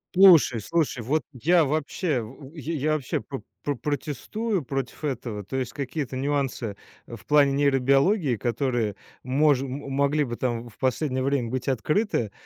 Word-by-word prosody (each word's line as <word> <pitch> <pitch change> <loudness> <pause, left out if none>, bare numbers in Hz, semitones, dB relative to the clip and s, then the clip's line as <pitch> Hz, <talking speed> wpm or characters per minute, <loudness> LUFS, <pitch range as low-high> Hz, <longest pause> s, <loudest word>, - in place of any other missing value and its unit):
Слушай 175 - +7
слушай, 145 -1 -1
вот 150 +7 0
я 165 +6 +3
вообще 150 0 -1
в 135 +6 -11
е 160 +2 -4
я 155 +1 +1
вообще 150 -5 -1
про 135 +5 -7 0.2
про 145 - -1
протестую 155 - -2
против 135 +2 -4
этого. 120 -7 -3
То 130 +7 -4
есть 125 -2 -3
какие-то 135 -1 -4
нюансы, 130 -6 -1 0.3
э, 120 - -8
в - - -19
плане 145 -2 +5
нейробиологии, 140 - +3
которые 120 -2 -1 0.3
мож 140 +1 +3
м 135 +1 -5
м 140 - -7
могли 140 +2 +2
бы 120 -4 -4
там 120 -2 -2
в 110 - -21
последнее 130 0 0
время 135 -3 0
быть 130 +1 -3
открыты, 135 - 0
135 Hz, 165 wpm, -25 LUFS, 125-150 Hz, 0.3 s, Слушай